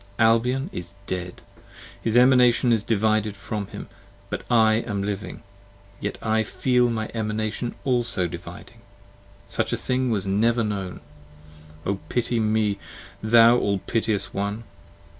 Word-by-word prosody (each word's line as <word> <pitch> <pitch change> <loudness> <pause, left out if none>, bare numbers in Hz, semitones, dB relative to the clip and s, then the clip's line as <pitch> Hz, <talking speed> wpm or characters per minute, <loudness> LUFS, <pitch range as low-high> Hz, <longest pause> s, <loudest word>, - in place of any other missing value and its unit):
Albion 120 +5 +3
is 90 +3 -7
dead! 90 -1 -5 0.6
his 115 +1 +1
Emanation 125 -1 +5
is 110 -2 +1
divided 110 -1 +1
from 100 0 -4
him! - - -8 0.4
But - - -2
I 110 -2 +5
am 100 -3 -2
living! 100 0 -5 0.6
yet 100 - -4
I 110 0 +2
feel 125 +2 +1
my 110 -2 -3
Emanation 110 +1 -2
also 120 -7 0
dividing. 85 0 -9 0.6
Such - - -2
thing 130 0 -1
was 105 -4 0
never 115 +4 +2
known! 100 -4 -4 0.8
O 100 0 -1
pity 120 -1 0
me, 110 -2 +1 0.4
thou 115 +2 +6
all 100 -1 +1
piteous 110 +1 -1
one! 100 +3 -3
110 Hz, 125 wpm, -24 LUFS, 100-120 Hz, 0.8 s, thou